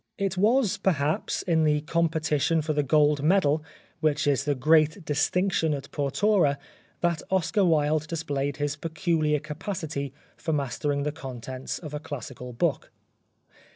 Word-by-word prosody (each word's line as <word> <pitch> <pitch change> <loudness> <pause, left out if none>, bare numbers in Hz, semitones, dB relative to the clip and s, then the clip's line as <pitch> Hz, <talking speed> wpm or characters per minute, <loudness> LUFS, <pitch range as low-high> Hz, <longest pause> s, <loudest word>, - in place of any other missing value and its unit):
It 195 -3 -1
was, 220 +3 +2
perhaps, 155 -4 0
in 165 -3 +2
the 150 -1 +2
competition 160 -1 +1
for 155 +1 -1
the 150 - +2
Gold 145 +1 +3
Medal 155 -2 +3 0.4
which 150 -2 +1
is 145 -3 +1
the 145 -1 +1
great 155 +5 +3
distinction 160 +2 +1
at 140 -1 -8
Portora 145 +2 +2 0.4
that 170 -2 +1
Oscar 190 +2 +2
Wilde 155 -2 +2
displayed 145 -4 -2
his 145 0 -1
peculiar 160 -1 0
capacity 155 -2 -4 0.3
for 160 - -2
mastering 140 +1 -1
the 150 - -1
contents 130 -3 -6
of 155 -3 -8
a 150 - -3
classical 130 -4 -7
book. 120 - -1
150 Hz, 140 wpm, -26 LUFS, 145-165 Hz, 0.4 s, Gold